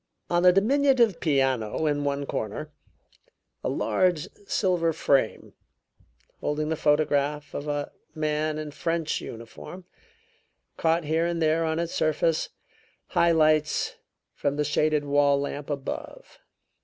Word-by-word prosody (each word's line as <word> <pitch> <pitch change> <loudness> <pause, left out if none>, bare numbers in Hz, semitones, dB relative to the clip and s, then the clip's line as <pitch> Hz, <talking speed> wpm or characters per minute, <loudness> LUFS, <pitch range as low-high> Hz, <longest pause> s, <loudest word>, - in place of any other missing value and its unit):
On 175 0 +3
the 180 0 +7
diminutive 240 0 +3
piano 135 -4 +1
in 145 -1 +1
one 140 0 -1
corner, 135 +6 -4 0.9
a - - 0
large 180 -4 +1 0.2
silver 175 -4 +1
frame, 140 -6 0 0.9
holding 150 +1 -2
the 160 - 0
photograph 150 -1 +1
of 145 - -5
a 145 -1 -2 0.2
man 155 0 -1
in 155 -1 -5
French 165 +1 -2
uniform, 115 +10 -9 0.9
caught 165 +1 +1
here 160 +3 +1
and 170 -1 -2
there 160 +1 +2
on 160 0 -1
its 170 0 -2
surface 155 +1 +1 0.6
high 170 0 +3
lights 155 -2 +2 0.4
from 140 0 -1
the 150 0 0
shaded 150 0 +1
wall 145 0 +3
lamp 140 +1 -4
above. 140 -2 -6
155 Hz, 125 wpm, -26 LUFS, 145-165 Hz, 0.9 s, the